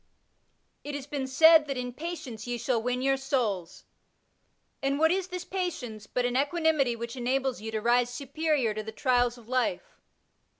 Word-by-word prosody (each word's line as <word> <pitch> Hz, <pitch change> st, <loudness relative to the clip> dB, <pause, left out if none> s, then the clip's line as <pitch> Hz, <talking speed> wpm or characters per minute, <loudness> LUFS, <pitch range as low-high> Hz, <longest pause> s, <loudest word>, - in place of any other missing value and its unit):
It 290 Hz, 0 st, -5 dB
has 285 Hz, -2 st, -5 dB
been 280 Hz, -2 st, -3 dB
said 315 Hz, +3 st, +6 dB
that 275 Hz, -2 st, -3 dB
^* -, -, -1 dB
in 250 Hz, 0 st, -4 dB
patience 300 Hz, -8 st, -6 dB
ye 245 Hz, 0 st, -2 dB
shall 235 Hz, 0 st, 0 dB
win 250 Hz, +2 st, -1 dB
yonr 270 Hz, 0 st, +2 dB
souls,'* 230 Hz, -11 st, -2 dB, 1.0 s
and 275 Hz, +1 st, 0 dB
what 320 Hz, +2 st, +4 dB
is 375 Hz, 0 st, 0 dB
this 360 Hz, -1 st, -6 dB
patience 250 Hz, -, -4 dB
but 250 Hz, +3 st, -1 dB
an 245 Hz, 0 st, -1 dB
equanimity 290 Hz, -3 st, +2 dB
which 235 Hz, +2 st, -6 dB
enables 255 Hz, 0 st, -1 dB
you 220 Hz, -, -5 dB
to 220 Hz, -1 st, -2 dB
rise 240 Hz, +1 st, +3 dB
superior 280 Hz, -2 st, 0 dB
to 215 Hz, -, -3 dB
the 220 Hz, +1 st, -7 dB
trials 245 Hz, +1 st, +1 dB
of 230 Hz, -2 st, -16 dB
life 255 Hz, -, -1 dB
255 Hz, 180 wpm, -28 LUFS, 240-295 Hz, 1.0 s, said